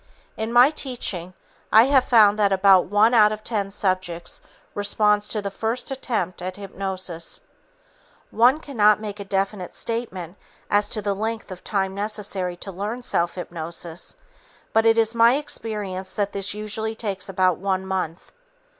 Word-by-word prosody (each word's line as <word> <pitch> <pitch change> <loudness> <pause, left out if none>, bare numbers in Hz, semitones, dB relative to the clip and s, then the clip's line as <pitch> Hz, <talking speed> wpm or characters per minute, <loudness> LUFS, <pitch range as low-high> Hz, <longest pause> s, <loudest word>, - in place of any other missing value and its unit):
In 220 +1 -3
my 245 +4 +7
teaching, 200 - -4 0.4
I 220 - +8
have 265 0 +4
found 215 -3 +5
that 200 -1 +3
about 190 -1 +5
one 210 +5 +3
out 215 -3 +6
of 215 0 -5
ten 205 -4 -2
subjects 185 -3 -2 0.3
responds 210 0 +2
to 210 -2 -2
the 200 - -3
first 225 +6 -2
attempt 235 -9 -2
at 185 +1 -4
hypnosis. 190 -4 -5 0.9
One 250 +6 +4
cannot 215 -8 +3
make 210 -1 -6
a - - -4
definite 195 -1 -2
statement 200 -6 -4 0.3
as 205 0 +2
to 215 -3 -2
the 200 0 0
length 220 +1 -4
of 180 - -9
time 190 -2 -1
necessary 200 -3 -3
to 195 - -7
learn 210 +7 -4
self 170 -7 0
hypnosis, 170 -1 -5 0.6
but 225 0 +4
it 225 0 +5
is 225 0 +2
my 235 +2 +5
experience 210 -9 -4
that 205 -1 0
this 200 +1 -4
usually 215 +1 -3
takes 200 -4 -4
about 185 -2 +2
one 190 0 -1
month. 185 -3 -4
205 Hz, 155 wpm, -23 LUFS, 190-220 Hz, 0.9 s, I